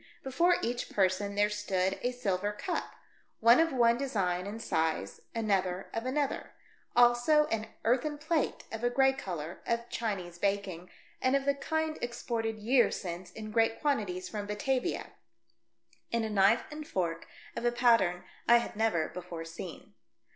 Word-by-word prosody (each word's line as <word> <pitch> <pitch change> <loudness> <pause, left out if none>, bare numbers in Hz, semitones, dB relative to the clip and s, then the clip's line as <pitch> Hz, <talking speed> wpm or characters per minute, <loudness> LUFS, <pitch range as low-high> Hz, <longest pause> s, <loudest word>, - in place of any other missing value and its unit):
Before 340 +7 +3
each 240 +1 -2
person 200 +1 +1
there 205 0 +4
stood 195 -2 0
a 245 - 0
silver 205 -5 -1
cup 350 - -3 0.2
— - - -34
one 230 +4 +7
of 325 0 +3
one 235 -2 +3
design 190 -9 -1
and 215 +3 -5
size, 160 - -1
another 195 -4 0
of 225 +2 -3
another; 280 +1 -1 0.4
also 245 +5 +5
an 225 0 -1 0.2
earthen 265 +6 +1
plate, 315 0 -1
of 225 +1 -5
a 245 - +3
grey 265 +2 +4
colour, 175 - -6
of 235 0 -1
Chinese 185 -7 -3
baking, 195 -3 -1 0.3
and 260 +1 +3
of 275 0 +1
the 280 - +3
kind 315 +2 -2
exported 230 -2 -2
years 240 +4 +3
since 175 -1 -6
in 215 -1 -7
great 225 0 +2
quantities 205 -11 -1
from 205 +1 -5
Batavia; 250 +5 -1 1.0
and 230 -1 +1
a 220 - -3
knife 200 +3 +4
and 300 0 -7
fork 170 -3 -2 0.3
of - - -4
a 240 - +3
pattern 230 -8 +3 0.2
I 235 - +8
had 235 - -3
never 210 -7 +1
before 175 -2 -7
seen. 165 +1 -9
225 Hz, 160 wpm, -31 LUFS, 190-250 Hz, 1.0 s, I